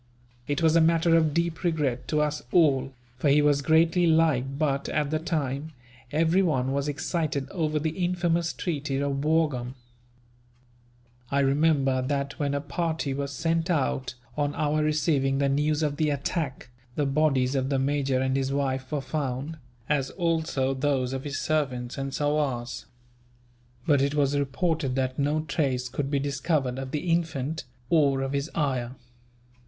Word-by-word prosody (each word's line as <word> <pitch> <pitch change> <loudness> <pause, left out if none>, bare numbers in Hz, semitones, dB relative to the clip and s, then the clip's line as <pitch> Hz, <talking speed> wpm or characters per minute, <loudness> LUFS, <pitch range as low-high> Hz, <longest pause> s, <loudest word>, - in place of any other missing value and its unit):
It 145 +3 -1
was 160 0 +4
a 165 - +6
matter 165 +1 +4
of 160 -2 +3
deep 170 +1 -1
regret 150 -8 0
to 150 -1 +1
us 150 0 -1
all, 135 -6 +3 0.3
for 145 - +2
he 145 +2 +5
was 145 -1 +3
greatly 165 +3 +3
liked 150 -5 +2
but, 140 -3 0
at 150 -2 0
the 155 - +1
time, 155 -2 -2 0.4
everyone 160 -4 +2
was 140 +1 -1
excited 145 -1 -2
over 155 -4 -1
the 155 +1 -1
infamous 175 -2 +1
treaty 145 -5 -3
of 140 0 -1
Wurgaum. 150 -6 +1 1.5
I 140 0 +2
remember 135 -2 +2
that 140 +1 -2
when 140 -1 0
a 140 - -1
party 155 0 -2
was 140 0 -3
sent 165 +4 -1
out, 135 -5 0 0.2
on 145 -1 -1
our 155 0 +1
receiving 150 -3 +1
the 140 0 +2
news 150 +2 +1
of 145 -1 -1
the 155 -2 +1
attack, 140 -3 -3 0.2
the 145 - +1
bodies 135 -2 +2
of 135 -1 0
the 140 - +1
major 135 -1 +1
and 130 0 0
his 135 0 0
wife 130 -2 -1
were 150 -2 -1
found, 140 +1 -3 0.3
as 140 -3 +1
also 160 -6 0
those 130 -2 0
of 135 +1 -4
his 145 0 -3
servants 135 -5 -1
and 135 0 -3
sowars; 145 -5 -1 1.0
but 145 -3 +4
it 140 +1 +1
was 145 -1 +2
reported 145 0 0
that 130 0 -1
no 145 +2 +1
trace 140 -5 -1
could 135 +2 -3
be 140 - +1
discovered 140 -1 -1
of 135 -1 -5
the 155 +5 -2
infant, 160 -3 -1 0.3
or 140 -5 +3
of 135 +1 -3
his 140 +2 -1
ayah. 130 -5 -1
145 Hz, 160 wpm, -26 LUFS, 135-155 Hz, 1.5 s, a